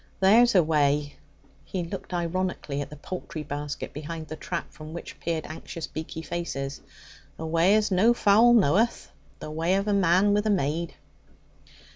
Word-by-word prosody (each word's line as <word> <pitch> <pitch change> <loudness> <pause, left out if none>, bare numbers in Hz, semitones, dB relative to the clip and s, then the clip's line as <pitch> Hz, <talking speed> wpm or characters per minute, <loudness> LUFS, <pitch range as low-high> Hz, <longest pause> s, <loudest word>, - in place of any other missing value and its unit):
"There's 225 +4 +5
a 180 - +6
way"' 145 -2 +1 0.5
(he 185 -2 -4
looked 185 +3 -7
ironically 175 -4 -2
at 145 - -6
the 150 - -9
poultry 155 0 -6
basket 145 0 -5
behind 155 +2 -6
the 155 - -5
trap, 170 +1 -5
from 155 +1 -10
which 170 - -8
peered 165 -2 -2
anxious, 160 +1 -7
beaky 160 +1 -7
faces) 145 -5 -4 0.6
'"a 160 - -5
way 165 +5 +3
as 215 -1 +1
no 195 +6 +5
fowl 225 +3 +5
knoweth, 215 +3 +2 0.3
the 155 - -7
way 165 +4 +1
of 195 +1 -1
a 205 - +2
man 195 +1 +4
with 210 +1 +1
a - - +2
maid."' 170 -3 0
170 Hz, 165 wpm, -26 LUFS, 155-195 Hz, 0.6 s, a